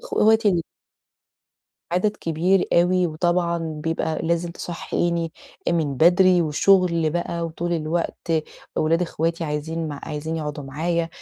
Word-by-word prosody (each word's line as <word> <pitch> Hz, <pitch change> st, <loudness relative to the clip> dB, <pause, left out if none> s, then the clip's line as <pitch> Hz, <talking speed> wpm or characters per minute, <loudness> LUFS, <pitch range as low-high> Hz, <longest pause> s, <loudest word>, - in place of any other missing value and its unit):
أخواتي 220 Hz, 0 st, +3 dB
ال 175 Hz, -4 st, +2 dB, 1.3 s
عدد 205 Hz, +4 st, +1 dB
كبير 175 Hz, +4 st, +1 dB
أوي 180 Hz, +1 st, +4 dB
وطبعًا 170 Hz, +1 st, 0 dB, 0.3 s
بيبقى 160 Hz, -1 st, -1 dB
لازم 170 Hz, +1 st, 0 dB
تصحيني 170 Hz, -1 st, -2 dB, 0.4 s
من 160 Hz, -5 st, 0 dB
بدري 180 Hz, +2 st, +5 dB
وشغل 170 Hz, +1 st, +3 dB
بقى 170 Hz, 0 st, -2 dB
وطُول 170 Hz, +2 st, -3 dB
الوقت 165 Hz, +1 st, -2 dB, 0.4 s
ولاد 165 Hz, +3 st, +2 dB
أخواتي 165 Hz, 0 st, -1 dB
عايزين 160 Hz, +2 st, -3 dB
مع 145 Hz, -1 st, -6 dB
عايزين 155 Hz, +2 st, -4 dB
يقعُدوا 150 Hz, -2 st, -4 dB
معايا 165 Hz, +5 st, -1 dB
170 Hz, 120 wpm, -23 LUFS, 160-175 Hz, 1.3 s, بدري